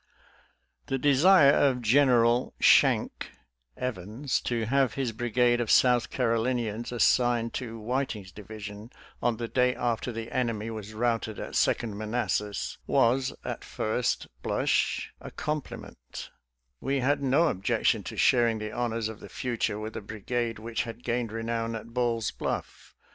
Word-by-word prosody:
The 135 - 0
desire 145 +3 +6
of 130 -4 +2
General 120 -1 +3
" - - -37
Shank - - +3 0.2
" - - -45
Evans 120 +3 -2
to 115 -2 -1
have 135 +2 +1
his 135 -4 -1
brigade 120 +2 +1
of 115 - -3
South 125 -2 +4
Carolinians 115 -2 -1
assigned 120 -1 +2
to 115 -2 -7
Whiting's 110 -4 -3
division, 105 +2 -9 0.3
on 120 -2 +1
the 115 - -3
day 125 +1 +2
after 120 +1 -1
the 115 0 -6
enemy 115 -3 -1
was 110 -1 -7
routed 115 -2 -1
at - - -6
Second 105 -3 +1
Manassas, 105 -2 -2
was, 130 +3 +2
at - - -4
first 115 +3 -1 0.2
blush, - - 0
a - - -8
compliment; 150 - -6 0.5
we 135 +1 -1
had 140 +3 +1
no 140 +5 +3
objection 95 - +1
to - - -7
sharing 120 -3 +3
the 105 0 -5
honors 115 -2 -2
of 110 -1 -8
the - - -11
future 115 -4 -2
with 110 +1 -6
a - - -4
brigade 115 +2 -3
which 115 +2 -3
had 115 +1 -7
gained 120 -2 -1
renown 115 0 -2
at 115 +1 -8
Ball's 120 -2 0
Bluff. - - -5
115 Hz, 150 wpm, -28 LUFS, 110-125 Hz, 0.5 s, desire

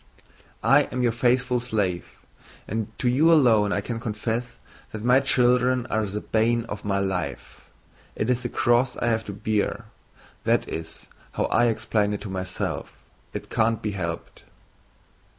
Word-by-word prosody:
"I - - +5
am 125 0 -1
your 120 - +3
faithful 125 +1 +2
slave 105 -7 -2 0.5
and 110 0 -2
to - - -1
you 145 +7 +4
alone 115 -10 +5
I 100 - 0
can 115 +2 -4
confess 115 +1 -3 0.3
that 110 -1 -6
my 125 +2 +5
children 125 -1 +2
are 110 - +1
the 105 +2 -4
bane 115 +1 +1
of 105 -3 -7
my 100 -1 0
life. 95 -3 -4 0.5
It 110 - -1
is 125 0 +1
the - - -3
cross 120 +1 +2
I - - -1
have 110 -1 +1
to - - -5
bear. 105 +1 -1 0.6
That - - +2
is 80 0 -7 0.3
how - - 0
I 120 - +4
explain 105 -2 +1
it 105 - -4
to 105 - -6
myself. 95 -1 -4 0.3
It - - -7
can't 115 0 +2
be 105 - -1
helped!" 85 -4 -5
115 Hz, 160 wpm, -25 LUFS, 105-125 Hz, 0.6 s, I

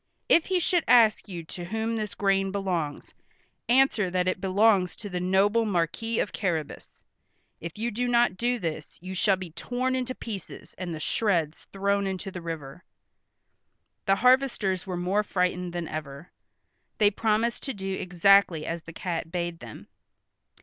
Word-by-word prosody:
If 335 - +4
he 375 -1 +2
should 350 0 +1
ask 225 -4 +5
you 175 -3 -6
to 175 +2 -7
whom 225 +4 -2
this 215 -2 -4
grain 195 -1 +1
belongs, 180 -7 -3 0.6
answer 245 -6 +4
that 180 0 0
it 185 - -1
belongs 195 -1 +3
to 205 - -8
the 180 - -2
noble 195 +5 +3
Marquis 210 +3 -1
of - - -1
Carrabas. 165 -7 -4 0.6
If 170 +2 -7
you 235 +2 -2
do 245 +4 -1
not 240 -5 +3
do 245 +5 0
this 160 -6 -5
you 185 +2 -7
shall 195 +1 +3
be 185 -3 -8
torn 250 +9 -2
into 255 0 -2
pieces, 210 -7 -8
and 180 -2 -4
the 160 - -5
shreds 165 -5 0
thrown 200 0 0
into 190 +1 -4
the 180 -2 -7
river." 165 -1 -7 1.2
The 195 - +5
harvesters 245 -7 +2
were 180 -2 -3
more 185 +4 +1
frightened 180 -3 -1
than 170 -1 -4
ever. 150 +1 -7 0.7
They 205 -1 +4
promised 225 +2 0
to 270 - -3
do 195 -1 -4
exactly 180 -2 +3
as 165 0 -3
the 165 +1 -11
cat 165 -2 -4
bade 175 -1 -3
them. 115 -2 -11
190 Hz, 165 wpm, -27 LUFS, 175-220 Hz, 1.2 s, ask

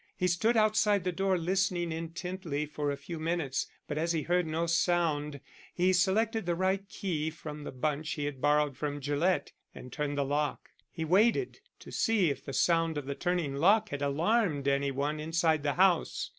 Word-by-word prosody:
He 180 - +1
stood 220 +7 +2
outside 215 -2 +3
the 180 - 0
door 190 +1 +1
listening 175 -1 0
intently 165 -1 -4
for 150 -1 -3
a 140 - -2
few 160 +3 -7
minutes, 160 -4 -1 0.2
but 150 0 -3
as 165 +1 0
he 160 -2 -1
heard 175 -1 +1
no 160 +2 -1
sound 165 -4 +1 0.4
he 185 +1 +3
selected 205 +3 +1
the 175 - +1
right 190 +2 0
key 160 -8 -2
from 150 -2 -8
the - - -5
bunch 150 +4 -2
he 145 -2 -3
had 140 -3 -5
borrowed 150 -1 +2
from 145 0 -3
Gillett, 145 +6 0 0.2
and 125 -1 -10
turned 145 -1 -2
the 140 - +1
lock. 145 +1 -2 0.2
He 160 -2 -4
waited 225 - +2 0.2
to - - -11
see 205 -8 +2
if 140 - -6
the - - -6
sound 165 +3 +2
of 145 - -4
the 140 - -3
turning 170 -4 -1
lock 205 +7 +4
had 145 -3 -5
alarmed 155 +1 +1
any 140 0 +2
one 145 +3 -2
inside 160 0 +1
the 145 -1 0
house. 180 -2 +2
165 Hz, 190 wpm, -30 LUFS, 145-185 Hz, 0.4 s, lock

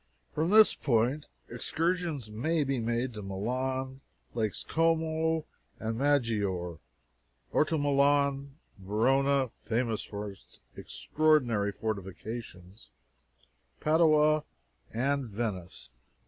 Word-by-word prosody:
From 160 +3 0
this 215 +1 +7
point, 125 +3 0 0.2
excursions 165 - -2
may 155 +9 0
be 135 -2 -1
made 120 +2 -1
to 105 - -7
Milan, 130 +7 -3 0.3
Lakes 110 -3 -2
Como 160 -1 +1 0.3
and 110 0 -2
Maggiore, 105 - 0 0.7
or - - +3
to 160 +1 -1
Milan, 140 -1 +2 0.2
Verona 130 +6 +2
(famous 115 -1 -1
for 105 0 -6
its 95 - -19 0.2
extraordinary 125 -10 +1
fortifications), 100 -1 -6 0.9
Padua, 155 -1 +4 0.5
and 135 +4 0
Venice. 100 - -5
130 Hz, 90 wpm, -30 LUFS, 110-150 Hz, 0.9 s, this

